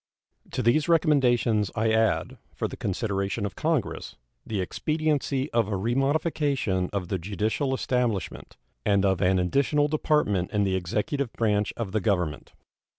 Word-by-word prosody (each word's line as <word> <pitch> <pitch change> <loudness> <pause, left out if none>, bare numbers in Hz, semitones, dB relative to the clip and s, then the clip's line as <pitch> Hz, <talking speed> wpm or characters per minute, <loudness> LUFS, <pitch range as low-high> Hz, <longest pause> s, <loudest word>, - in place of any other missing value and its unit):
To - - -1
these 140 +8 +3
recommendations 125 - +3
I 110 +1 +1
add, 110 -1 +1 0.2
for - - -1
the - - -8
consideration 100 +1 -2
of 100 - -4
Congress, 155 -5 -2 0.3
the 105 -3 -3
expediency 150 - -1
of 115 -3 +2
a 105 - -2
remodification 135 - 0
of 95 -4 -3
the 95 - -1
judiciary 105 - -1
establishment, 125 -6 -2 0.3
and 100 -1 +2
of 95 -2 +1
an 95 0 +3
additional 140 - +2
department 150 - +1
in 105 -1 +1
the 95 -1 +1
executive 110 - -2
branch 105 -2 +1
of 115 -5 -3
the 110 +1 0
Government. 90 -8 -1
110 Hz, 145 wpm, -26 LUFS, 100-140 Hz, 0.3 s, these